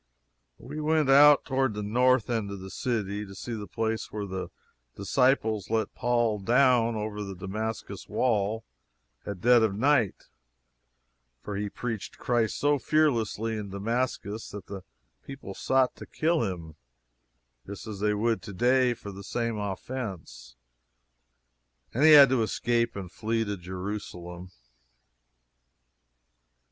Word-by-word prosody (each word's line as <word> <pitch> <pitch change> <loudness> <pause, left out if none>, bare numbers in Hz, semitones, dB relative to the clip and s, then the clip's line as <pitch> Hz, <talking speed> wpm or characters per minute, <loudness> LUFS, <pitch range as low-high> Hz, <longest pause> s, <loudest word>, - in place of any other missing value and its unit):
We 155 - -8
went 155 -2 +2
out 145 +1 +7
toward 130 -4 0
the 105 - -3
north 125 +2 +3
end 110 -4 -1
of 100 -1 -6
the 95 0 -9
city 105 -4 -2
to 95 -1 -10
see 120 +5 -6
the 105 -2 -5
place 110 +4 -2
where 105 -1 -4
the 95 -1 -4 0.5
disciples 110 -1 +1
let 110 0 0
Paul 120 -3 +1
down 120 +1 +3
over 105 -1 -4
the 100 -1 -6
Damascus 105 +4 -5
wall 110 -2 0 0.6
at 100 -3 -5
dead 120 0 +6
of 110 -3 +1
night 125 -2 +2 1.2
for 105 - -5
he 100 +1 -2
preached 115 -1 -5
Christ 120 -3 0
so 145 0 +2
fearlessly 115 -6 +1
in 105 -2 -5
Damascus 110 +1 -3
that 100 -2 -8
the 100 -1 -7 0.4
people 135 -8 -8
sought 130 +5 +1
to - - -10
kill 165 +1 +1
him, 80 -3 -9 0.9
just 100 0 -8
as 105 -3 -7
they 105 0 +1
would 110 -1 0
to 100 +1 -9
day 125 +4 +3
for 105 -3 -9
the 100 +1 -10
same 115 +1 -2
offense, 100 - -6 1.4
and 130 - +1
he 155 0 +8
had 140 -3 +10
to 130 -2 +2
escape 115 +1 0
and 95 -3 -6
flee 115 +2 -1
to 100 -1 -3
Jerusalem. 90 -1 -7
110 Hz, 140 wpm, -28 LUFS, 100-125 Hz, 1.4 s, had